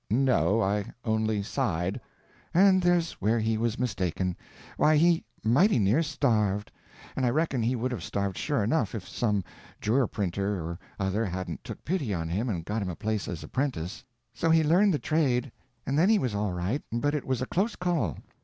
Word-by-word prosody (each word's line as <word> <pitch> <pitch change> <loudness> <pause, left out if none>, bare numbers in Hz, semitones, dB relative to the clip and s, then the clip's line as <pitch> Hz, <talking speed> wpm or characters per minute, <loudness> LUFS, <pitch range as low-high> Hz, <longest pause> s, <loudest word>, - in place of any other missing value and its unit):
"No—I 110 -4 +2
only 110 -2 0
sighed." 95 -7 -1 0.5
"And 190 +1 +6
there's 175 -2 +2
where 110 +4 +2
he 110 0 +1
was 115 +1 -1
mistaken. 95 -6 -1 0.4
Why, 155 +1 +4
he 170 +1 +4 0.2
mighty 140 - +4
near 110 +8 +3
starved. 110 -10 0 0.4
And 135 - -1
I 125 - +3
reckon 140 -1 0
he 120 +3 +1
would 125 +2 -2
have 125 - -4
starved 100 -2 -2
sure 145 -7 0
enough, 115 -1 0
if 100 -4 -6
some 105 -5 0 0.4
jour' 120 +3 +2
printer 100 +1 -2
or 85 +1 -5 0.2
other 100 +3 0
hadn't 90 -4 -4
took - - -9
pity 140 - -1
on 80 -1 -3
him 105 +9 -1
and 85 -6 -3
got 105 +3 -2
him 95 - -2
a 90 - -4
place 110 0 -2
as 85 -4 -5
apprentice. 125 - -3 0.3
So 165 - 0
he 160 0 +5
learnt 180 +7 +4
the 155 - +2
trade, 140 -5 +1 0.3
and 140 +3 +1
then 180 +5 +4
he 220 - +5
was 125 - -1
all 105 -1 -1
right—but 115 +9 -1
it 150 - -1
was 130 -1 -1
a - - -1
close 200 - 0
call. 165 - -1
115 Hz, 185 wpm, -28 LUFS, 100-145 Hz, 0.5 s, And